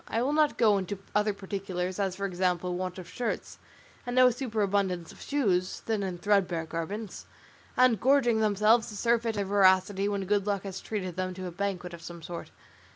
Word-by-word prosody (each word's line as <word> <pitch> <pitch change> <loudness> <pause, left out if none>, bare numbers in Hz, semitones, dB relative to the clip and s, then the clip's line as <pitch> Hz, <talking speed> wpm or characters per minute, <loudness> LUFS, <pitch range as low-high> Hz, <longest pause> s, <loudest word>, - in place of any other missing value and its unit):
I 230 - 0
will 280 +3 0
not 305 -1 +3
go 210 -4 +4
into 195 +1 -4 0.2
other 210 0 +2
particulars, 190 -2 -4
as 190 -2 0
for 200 - -3
example 180 -1 0
want 185 0 -4
of 180 -2 -8
shirts, 240 +5 -4 0.4
and 245 0 -4
no 255 0 +7
superabundance 200 -8 -1
of - - -15
shoes, 190 -11 0
thin 220 -2 0
and 185 -3 -3
threadbare 180 -4 +1
garments, 185 +6 -5 0.5
and 250 -5 +4
gorging 255 -4 +4
themselves 215 +2 +3
to 210 - -8
surfeit 230 0 +1
in 205 - 0
their - - -1
voracity 195 0 +3
when 200 -1 -2
good 205 +1 +1
luck 200 -2 0
has 190 -1 -6
treated 185 -5 -4
them 185 0 -2
to 185 0 -6
a 180 - -4
banquet 180 -1 -3
of 170 - -9
some 170 0 -9
sort. 170 +1 -7
200 Hz, 195 wpm, -29 LUFS, 185-220 Hz, 0.5 s, no